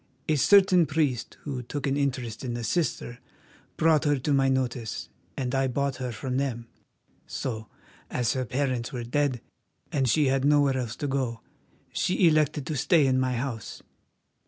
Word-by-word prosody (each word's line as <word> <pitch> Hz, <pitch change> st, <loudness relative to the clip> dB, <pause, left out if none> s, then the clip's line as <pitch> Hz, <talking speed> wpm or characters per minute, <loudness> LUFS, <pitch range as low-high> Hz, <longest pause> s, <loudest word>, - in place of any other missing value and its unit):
A 155 Hz, -, +2 dB
certain 185 Hz, +1 st, +5 dB
priest, 145 Hz, -6 st, -1 dB
who 135 Hz, -4 st, -4 dB
took 135 Hz, +3 st, -5 dB
an 135 Hz, -1 st, +1 dB
interest 130 Hz, -5 st, -2 dB
in 120 Hz, -2 st, -3 dB
the 120 Hz, -, -4 dB
sister, 120 Hz, -3 st, -1 dB, 0.6 s
brought 160 Hz, -2 st, +4 dB
her 145 Hz, -1 st, +3 dB
to 140 Hz, +3 st, -1 dB
my 135 Hz, -1 st, +3 dB
notice 125 Hz, -3 st, -2 dB, 0.3 s
and 125 Hz, -1 st, -2 dB
I 135 Hz, 0 st, +2 dB
bought 140 Hz, +1 st, -1 dB
her 125 Hz, -1 st, -3 dB
from 125 Hz, +3 st, -3 dB
them; 125 Hz, -4 st, -2 dB, 0.6 s
so, 110 Hz, -4 st, -4 dB, 0.4 s
as 120 Hz, -3 st, 0 dB
her 130 Hz, -, -1 dB
parents 125 Hz, 0 st, -2 dB
were 125 Hz, -3 st, -4 dB
dead 130 Hz, 0 st, 0 dB, 0.5 s
and 135 Hz, -3 st, +1 dB
she 150 Hz, +5 st, +3 dB
had 135 Hz, 0 st, +1 dB
nowhere 145 Hz, -1 st, +4 dB
else 120 Hz, -3 st, -3 dB
to 145 Hz, -, -3 dB
go, 130 Hz, -4 st, -2 dB, 0.5 s
she 180 Hz, 0 st, +2 dB
elected 155 Hz, -2 st, +2 dB
to 155 Hz, -, -3 dB
stay 150 Hz, +2 st, +3 dB
in 130 Hz, -1 st, +2 dB
my 130 Hz, -1 st, +1 dB
house. 120 Hz, -3 st, -5 dB
135 Hz, 170 wpm, -27 LUFS, 125-145 Hz, 0.6 s, certain